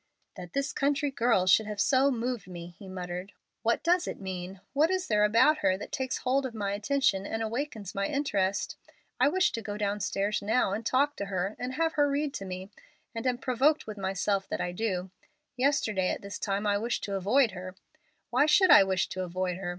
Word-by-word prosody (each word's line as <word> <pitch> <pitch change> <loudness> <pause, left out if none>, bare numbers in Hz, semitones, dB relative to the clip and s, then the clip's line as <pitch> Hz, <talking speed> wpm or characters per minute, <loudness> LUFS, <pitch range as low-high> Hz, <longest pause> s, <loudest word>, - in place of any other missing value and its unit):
"That 180 -2 -9
this 275 +1 -1
country 285 0 0
girl 230 -7 +2
should 210 +4 +4
have 210 -1 -5
so 270 +5 +4
moved 240 -5 -2
me!" 175 -1 -8
he 195 - -10
muttered. 180 +1 -6 0.3
"What 235 +1 +1
does 350 +1 +2
it - - -5
mean? 185 0 -6
What 300 +4 +3
is 375 0 0
there 210 -1 +2
about 230 +9 +4
her 185 -9 +2
that 205 - -8
takes 265 -3 -2
hold 265 +2 +1
of 255 -3 -5
my 200 -2 -2
attention 205 -3 +1
and 225 0 -2
awakens 225 -3 -4
my 200 0 -1
interest? 200 -10 -1 0.4
I 255 - +5
wish 365 +4 +2
to 230 - -4
go 205 -1 -5
downstairs 205 0 -1
now, 215 0 +1
and 215 +3 -3
talk 280 +5 +2
to 200 - -3
her, 195 +1 -2
and 255 +1 -4
have 325 +1 +1
her 290 -1 +3
read 285 0 -1
to 195 - -5
me, 185 +1 -7 0.4
and 230 +2 -3
am 250 -1 +1
provoked 265 +5 +2
with 215 -2 -7
myself 195 +1 -1
that - - -2
I 175 - -2
do. 185 -2 -2 0.4
Yesterday 245 -8 +1
at - - -3
this 200 0 -6
time 200 0 -1
I 205 -1 +2
wished 235 +3 -2
to 200 - -3
avoid 215 +6 +3
her. 185 0 -8 0.6
"Why 290 - +4
should 370 +4 +5
I - - +9
wish 190 -3 0
to 185 - -4
avoid 180 0 -2
her? 185 -2 -4
210 Hz, 210 wpm, -29 LUFS, 190-270 Hz, 0.6 s, I